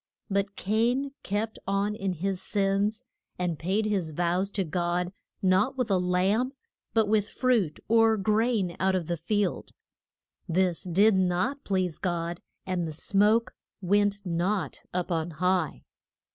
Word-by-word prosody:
But 200 +1 0
Cain 240 +7 +1
kept 210 +3 -3
on 200 +1 +1
in 195 -3 -2
his 185 +2 -2
sins, 200 +3 0 0.3
and 175 -3 -2
paid 195 +6 0
his 190 -7 -1
vows 175 +4 0
to 200 -1 -1
God 175 +2 -1 0.3
not 210 +9 +3
with 245 -5 -1
a 190 - +3
lamb, 190 +8 +1 0.4
but 220 -2 +4
with 210 0 +2
fruit 235 - +1
or 225 0 +4
grain 210 -2 +1
out 190 0 +2
of 180 -3 -1
the 170 - -1
field. 200 +4 -1 0.8
This 180 +1 +1
did 200 +5 +4
not 190 +10 0
please 185 -4 -1
God, 170 -1 -2 0.2
and 180 -3 -1
the 155 - -5
smoke 210 +8 +2 0.3
went 205 +1 +1
not 175 -2 -1
up 180 0 -2
on 165 0 0
high. 180 0 0
195 Hz, 145 wpm, -27 LUFS, 180-210 Hz, 0.8 s, but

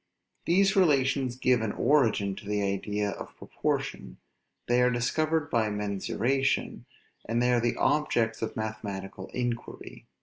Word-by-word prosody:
These 195 +3 +3
relations 135 -7 +2
give 125 -2 +2
an 110 -2 -2
origin 115 -8 +2
to 100 - -10
the 105 0 0
idea 100 +1 -1
of - - -9
proportion. - - -3 0.5
They 120 +1 +3
are 125 - +4
discovered 145 +5 0
by 110 -2 +2
mensuration, 105 +6 -1 0.4
and 115 +1 -1
they 125 0 +3
are 120 - +3
the 120 0 0
objects 120 -6 +1
of 115 - -3
mathematical 100 -3 -5
inquiry. 120 -2 -5
120 Hz, 135 wpm, -28 LUFS, 105-135 Hz, 0.5 s, are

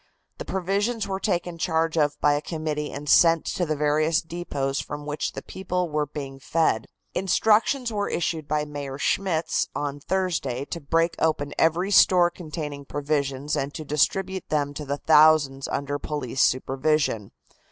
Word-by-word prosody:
The - - -5
provisions 200 +5 -1
were 190 -1 -3
taken 175 -4 -2
charge 160 -1 0
of 150 -2 +1
by 145 - +4
a 145 - 0
committee 155 -2 -3
and 145 +1 -7
sent 165 +1 +5
to 175 - -1
the 155 - 0
various 155 +2 +2
depots 145 -5 -3
from 145 0 -6
which 150 0 -3
the - - -7
people 180 -2 -3
were 150 -1 0
being 135 -2 -7
fed. 135 -7 +1 0.3
Instructions 220 +6 +2
were 205 -1 -1
issued 160 -3 -2
by 150 0 0
Mayor 145 -2 -6
Schmitz 170 +2 0
on 145 -1 -3
Thursday 165 -7 -1
to 170 - -6
break 165 +3 +1
open 150 -3 0
every 170 +5 +2
store 180 -3 +6
containing 150 -4 -6
provisions 140 0 -2
and 140 +1 -3
to 155 - -6
distribute 190 +6 0
them 145 -2 0
to 150 +1 -6
the 140 +1 -2
thousands 150 -3 +4
under 145 +1 -2
police 135 -4 -3
supervision. 130 -4 +1
155 Hz, 160 wpm, -25 LUFS, 145-175 Hz, 0.3 s, store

